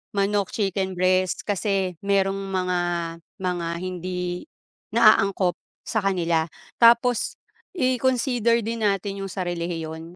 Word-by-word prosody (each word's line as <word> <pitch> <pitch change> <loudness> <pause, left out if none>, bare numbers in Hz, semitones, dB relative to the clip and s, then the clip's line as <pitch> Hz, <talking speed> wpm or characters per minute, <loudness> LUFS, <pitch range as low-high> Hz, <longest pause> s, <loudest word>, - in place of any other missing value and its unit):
Manok, 200 0 0
chicken 195 -2 -1
breast 185 0 +1
kasi 195 -3 -1
merong 195 -1 +1
mga 185 -1 0 0.7
mga 175 -2 -1 0.2
hindi 180 - -4 0.4
na - - +6
angkop 190 -2 0 0.2
sa 220 - -1
kanila. 170 -5 +1 0.3
Tapos 235 0 +4 0.4
i-consider 250 - +2
din 225 0 -1
natin 200 0 -1
yung - - -3
sa 185 - -3
relihiyon. 170 -1 -4
195 Hz, 110 wpm, -24 LUFS, 180-210 Hz, 0.7 s, na